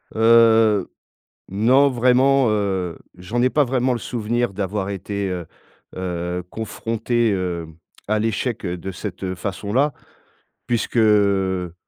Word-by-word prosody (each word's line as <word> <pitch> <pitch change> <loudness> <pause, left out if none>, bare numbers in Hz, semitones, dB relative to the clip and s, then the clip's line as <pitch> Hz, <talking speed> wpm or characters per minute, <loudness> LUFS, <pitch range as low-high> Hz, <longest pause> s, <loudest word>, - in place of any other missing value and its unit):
Heu. 110 -3 +5 0.6
Non 125 +8 +4
vraiment, 130 +1 +3
heu, 95 -5 -1 0.2
j'en 90 +7 -3
ai 130 - +3
pas 150 +3 +3
vraiment 130 -1 0
le 120 - -3
souvenir, 120 0 -2
d'avoir 100 0 -3
été, 100 0 -3
heu, 90 -2 -4 0.5
heu, 90 -1 -3
confronté, 115 +2 -1
hem, 85 -5 -3 0.3
à 110 0 +2
l'échec, 115 +1 -2
heu, 90 0 -3
de 95 +3 -6
cette, 95 0 -7
heu, 95 -1 -2
façon 100 +2 -5
là. 140 +5 +2 0.7
Puisque, 120 0 -1
heu, 100 -5 +2
105 Hz, 130 wpm, -21 LUFS, 95-120 Hz, 0.7 s, Heu